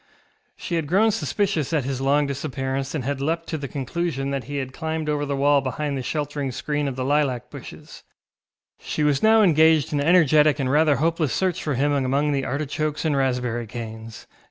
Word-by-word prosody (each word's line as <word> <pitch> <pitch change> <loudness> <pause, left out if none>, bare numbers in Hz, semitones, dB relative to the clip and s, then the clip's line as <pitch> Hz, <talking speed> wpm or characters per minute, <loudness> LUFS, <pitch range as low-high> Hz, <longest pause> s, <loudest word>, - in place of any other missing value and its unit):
She 170 - -3
had 160 -3 -2
grown 205 +7 +3
suspicious 165 -3 -1
at 150 -4 +1
his 135 0 -3
long 145 +2 +2
disappearance, 135 0 -3
and 145 - -2
had 140 +1 -3
leapt 165 +3 -1
to 160 - -2
the 140 - -5
conclusion 140 +1 -3
that 135 -2 -3
he 145 +1 -5
had 130 -1 -4
climbed 160 0 -3
over 145 -1 -1
the 140 - -1
wall 140 +1 +3
behind 140 +2 -3
the 135 - -3
sheltering 145 0 -3
screen 145 +3 -2
of 135 - -3
the 130 0 -3
lilac 135 -4 0
bushes; - - -11 0.8
she 155 - -3
was 145 -2 +2
now 220 0 +5
engaged 160 -4 +4
in 145 - +1
energetic 155 -2 +4
and 130 -3 -1
rather 150 0 +4
hopeless 160 0 0
search 185 -3 0
for 150 -3 -2
him 145 +4 +1
among 140 +1 +1
the 140 -2 -1
artichokes 150 +3 -2
and 155 -2 +1
raspberry 125 -3 -1
canes. 110 -1 -8
145 Hz, 195 wpm, -23 LUFS, 135-155 Hz, 0.8 s, now